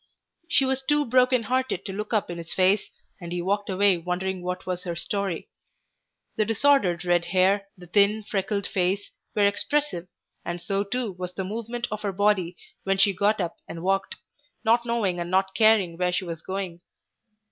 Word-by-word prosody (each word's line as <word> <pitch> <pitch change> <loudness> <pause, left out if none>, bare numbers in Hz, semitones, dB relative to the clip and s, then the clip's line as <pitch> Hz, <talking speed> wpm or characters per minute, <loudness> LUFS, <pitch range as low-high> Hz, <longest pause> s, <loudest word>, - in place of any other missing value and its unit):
She 275 - +4
was 265 0 0
too 295 +2 +2
broken 255 0 +3
hearted 255 -4 -1
to 195 - -4
look 210 +2 -5
up 210 -5 0
in 170 - -6
his 165 0 -7
face, 190 +2 +3 0.3
and 170 -2 -8
he 175 - -2
walked 200 +4 -1
away 190 -1 +3
wondering 180 +2 -2
what 180 +1 -4
was 180 -1 -3
her 170 -1 -4
story. 195 -1 -3 0.9
The 215 - +3
disordered 215 -6 +2
red 175 -1 +2
hair, 195 +2 +2
the 180 - -12
thin, 205 +4 +3
freckled 200 0 -2
face, 190 +2 -1 0.2
were 205 -1 +4
expressive, 205 - 0 0.4
and 175 0 -4
so 195 +3 -1
too 235 +1 -2
was 180 0 -7
the 190 - -2
movement 230 +4 -4
of 215 0 -4
her 200 - -1
body 190 -3 +1 0.3
when 195 0 +1
she 195 +1 +5
got 205 +3 +2
up 175 -3 -2
and 165 0 -7
walked, 195 +1 0 0.5
not 235 +2 +3
knowing 210 -7 0
and 170 0 -3
not 190 +1 +1
caring 215 -7 +4
where 180 0 +2
she 180 +1 -1
was 165 -2 -6
going. 185 -2 -5
195 Hz, 185 wpm, -25 LUFS, 180-215 Hz, 0.9 s, she